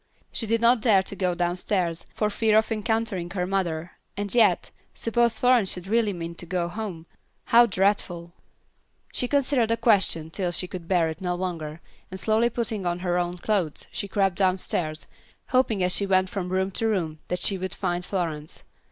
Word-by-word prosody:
She 225 Hz, -, -4 dB
did 230 Hz, +1 st, +1 dB
not 235 Hz, 0 st, +4 dB
dare 205 Hz, -5 st, +4 dB
to 200 Hz, -, -6 dB
go 180 Hz, -2 st, 0 dB
downstairs 175 Hz, -1 st, -1 dB
for 210 Hz, -1 st, -1 dB
fear 215 Hz, 0 st, +3 dB
of 220 Hz, +1 st, +2 dB
encountering 220 Hz, -5 st, -1 dB
her 180 Hz, 0 st, -2 dB
mother, 175 Hz, -3 st, -2 dB, 0.3 s
and 205 Hz, -1 st, -3 dB
yet, 235 Hz, -2 st, +3 dB, 0.2 s
suppose 230 Hz, 0 st, +1 dB
Florence 245 Hz, -6 st, +4 dB
should 180 Hz, -1 st, -4 dB
really 220 Hz, +1 st, +2 dB
mean 170 Hz, -2 st, -5 dB
to -, -, -7 dB
go 175 Hz, -1 st, -1 dB
home. 185 Hz, -5 st, -6 dB, 0.4 s
How 235 Hz, +1 st, +6 dB
dreadful! 185 Hz, -4 st, 0 dB, 0.8 s
She 250 Hz, -, -1 dB
considered 270 Hz, -4 st, +2 dB
the 230 Hz, -, +2 dB
question 190 Hz, -9 st, +2 dB
till 185 Hz, 0 st, -2 dB
she 180 Hz, -, -2 dB
could 180 Hz, -2 st, -8 dB
bear 170 Hz, -3 st, +2 dB
it 160 Hz, +2 st, -7 dB
no 180 Hz, -1 st, -1 dB
longer, 165 Hz, -3 st, -4 dB, 0.3 s
and, 190 Hz, -, -7 dB
slowly 220 Hz, +3 st, +2 dB
putting 220 Hz, -5 st, -2 dB
on 175 Hz, 0 st, 0 dB
her 175 Hz, 0 st, +1 dB
own 175 Hz, 0 st, -2 dB
clothes, 180 Hz, -5 st, -1 dB
she 200 Hz, -, -4 dB
crept 195 Hz, -2 st, +1 dB
downstairs, 180 Hz, -4 st, 0 dB, 0.4 s
hoping 255 Hz, -7 st, +2 dB
as 180 Hz, 0 st, +1 dB
she 200 Hz, -, +1 dB
went 185 Hz, -1 st, +2 dB
from 185 Hz, -3 st, -3 dB
room 190 Hz, +1 st, 0 dB
to 225 Hz, +4 st, -1 dB
room 165 Hz, -8 st, -1 dB
that 180 Hz, 0 st, -3 dB
she 195 Hz, 0 st, 0 dB
would 185 Hz, +1 st, -4 dB
find 180 Hz, -2 st, -2 dB
Florence. 165 Hz, -5 st, -4 dB
190 Hz, 185 wpm, -25 LUFS, 175-220 Hz, 0.8 s, How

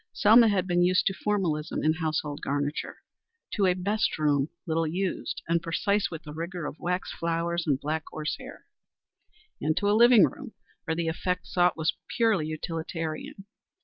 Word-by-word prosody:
Selma 225 Hz, +3 st, +6 dB
had 195 Hz, -4 st, +1 dB
been 175 Hz, -1 st, +1 dB
used 180 Hz, +1 st, +3 dB
to 195 Hz, -, +2 dB
formalism 175 Hz, -7 st, -1 dB
in 155 Hz, -, +3 dB
household 155 Hz, -2 st, -2 dB
garniture 145 Hz, +1 st, -3 dB, 0.5 s
to 200 Hz, -3 st, +2 dB
a 180 Hz, -, +3 dB
best 205 Hz, +4 st, 0 dB
room 145 Hz, -2 st, +1 dB, 0.2 s
little 165 Hz, 0 st, 0 dB
used 185 Hz, +4 st, -3 dB
and 170 Hz, 0 st, +2 dB
precise 200 Hz, +5 st, 0 dB
with 165 Hz, -1 st, -7 dB
the 150 Hz, -, -9 dB
rigor 170 Hz, +1 st, -5 dB
of 150 Hz, -, -6 dB
wax 180 Hz, +1 st, -2 dB
flowers 170 Hz, 0 st, -2 dB
and 140 Hz, -3 st, +2 dB
black 155 Hz, +2 st, -2 dB
horse 155 Hz, -1 st, -3 dB
hair, -, -, -11 dB, 1.0 s
and 155 Hz, +2 st, 0 dB
to 205 Hz, -, +1 dB
a -, -, +4 dB
living 235 Hz, 0 st, +7 dB
room 265 Hz, -6 st, -7 dB, 0.3 s
where 160 Hz, -2 st, -1 dB
the 170 Hz, 0 st, -1 dB
effect 180 Hz, +3 st, -2 dB
sought 180 Hz, -2 st, +2 dB
was 160 Hz, 0 st, 0 dB, 0.2 s
purely 220 Hz, -10 st, +2 dB
utilitarian. 160 Hz, +3 st, -5 dB
170 Hz, 170 wpm, -27 LUFS, 155-190 Hz, 1.0 s, living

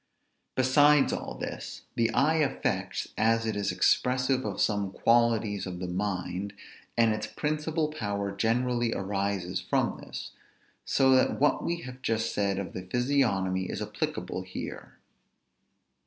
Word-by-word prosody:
Besides 145 Hz, +3 st, +5 dB
all -, -, -4 dB
this, -, -, -6 dB
the 115 Hz, -1 st, +2 dB
eye 155 Hz, +7 st, +3 dB
affects, 145 Hz, -4 st, -1 dB
as 115 Hz, +1 st, +3 dB
it 110 Hz, -2 st, -1 dB
is 100 Hz, -2 st, 0 dB
expressive 130 Hz, +7 st, +2 dB
of 100 Hz, -3 st, -3 dB
some 100 Hz, -2 st, +1 dB
qualities 115 Hz, -3 st, +2 dB
of 90 Hz, -1 st, -5 dB
the 90 Hz, -, -4 dB
mind, 95 Hz, +1 st, -3 dB, 0.4 s
and 115 Hz, -2 st, +4 dB
its 110 Hz, 0 st, -3 dB
principal 155 Hz, +1 st, -1 dB
power 100 Hz, -9 st, -3 dB
generally 120 Hz, +3 st, +1 dB
arises 100 Hz, -2 st, -2 dB
from -, -, 0 dB
this; -, -, -7 dB, 0.5 s
so 135 Hz, 0 st, +4 dB
that 130 Hz, -1 st, +3 dB
what 145 Hz, +2 st, +3 dB
we 170 Hz, 0 st, -2 dB
have 130 Hz, -2 st, -9 dB
just 110 Hz, -4 st, 0 dB
said 100 Hz, -1 st, 0 dB
of 95 Hz, -3 st, -4 dB
the 95 Hz, -, -4 dB
physiognomy 95 Hz, -4 st, +1 dB
is -, -, -3 dB
applicable -, -, -3 dB
here. -, -, -7 dB
115 Hz, 140 wpm, -28 LUFS, 100-130 Hz, 0.5 s, Besides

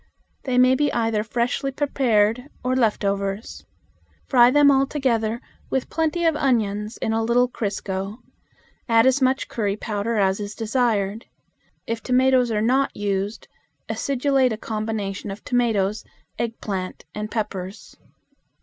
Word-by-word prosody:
They 255 Hz, -2 st, 0 dB
may 255 Hz, +1 st, +6 dB
be 290 Hz, +2 st, +1 dB
either 225 Hz, -2 st, +1 dB
freshly 245 Hz, +4 st, -1 dB
prepared 250 Hz, -3 st, +1 dB
or 255 Hz, +1 st, +1 dB
left 225 Hz, -5 st, +1 dB
overs. 200 Hz, +2 st, -3 dB, 0.6 s
Fry 245 Hz, -2 st, +6 dB
them 290 Hz, +1 st, +6 dB
all 270 Hz, 0 st, +3 dB
together 235 Hz, -6 st, 0 dB, 0.3 s
with 265 Hz, -, -2 dB
plenty 325 Hz, +1 st, 0 dB
of 325 Hz, -2 st, +3 dB
onions 215 Hz, -6 st, 0 dB
in 220 Hz, -, -1 dB
a 225 Hz, -, +1 dB
little 240 Hz, +2 st, +3 dB
crisco; 200 Hz, -3 st, -4 dB, 0.7 s
add 230 Hz, 0 st, +5 dB
as 260 Hz, +1 st, +3 dB
much 260 Hz, +1 st, +2 dB
curry 205 Hz, -3 st, -2 dB
powder 215 Hz, +1 st, -2 dB
as 195 Hz, -1 st, +2 dB
is 205 Hz, 0 st, -5 dB
desired. 225 Hz, -3 st, 0 dB, 0.6 s
If 230 Hz, 0 st, -3 dB
tomatoes 255 Hz, -1 st, +3 dB
are 215 Hz, -1 st, 0 dB
not 265 Hz, +4 st, +1 dB
used, 200 Hz, +1 st, -2 dB, 0.4 s
acidulate 270 Hz, -1 st, +1 dB
a 220 Hz, -, -2 dB
combination 215 Hz, -3 st, -4 dB
of 195 Hz, +2 st, -7 dB
tomatoes, 220 Hz, -4 st, 0 dB, 0.4 s
eggplant, 200 Hz, -7 st, -4 dB
and 210 Hz, 0 st, -4 dB
peppers. 205 Hz, -2 st, -5 dB
225 Hz, 135 wpm, -23 LUFS, 210-255 Hz, 0.7 s, may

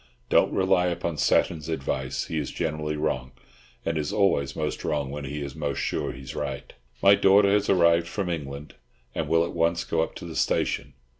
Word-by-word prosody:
Don't -, -, +4 dB
rely 95 Hz, -1 st, +2 dB
upon 85 Hz, -2 st, -2 dB
Satton's 80 Hz, 0 st, +1 dB
advice. 65 Hz, -4 st, -2 dB
He 80 Hz, -, -2 dB
is 70 Hz, -, -3 dB
generally 75 Hz, -2 st, -2 dB
wrong, 65 Hz, -4 st, -2 dB, 0.5 s
and 80 Hz, -1 st, 0 dB
is 75 Hz, -1 st, -2 dB
always 70 Hz, -10 st, +1 dB
most 75 Hz, -1 st, -3 dB
wrong 75 Hz, -3 st, -1 dB
when 70 Hz, 0 st, -5 dB
he 70 Hz, +2 st, -4 dB
is 70 Hz, -1 st, -6 dB
most 75 Hz, -3 st, -2 dB
sure -, -, -1 dB
he 65 Hz, -, -10 dB
is 65 Hz, -, -7 dB
right. -, -, -5 dB, 0.3 s
My 100 Hz, 0 st, +8 dB
daughter 100 Hz, 0 st, +5 dB
has 105 Hz, 0 st, +2 dB
arrived 85 Hz, -2 st, +4 dB
from 95 Hz, +2 st, -3 dB
England, 75 Hz, -3 st, -5 dB, 0.4 s
and -, -, -2 dB
will 85 Hz, 0 st, +3 dB
at -, -, -6 dB
once 85 Hz, 0 st, +1 dB
go 80 Hz, -, 0 dB
up 80 Hz, -, -3 dB
to -, -, -8 dB
the -, -, -7 dB
station. 70 Hz, -1 st, 0 dB
80 Hz, 200 wpm, -26 LUFS, 70-85 Hz, 0.5 s, My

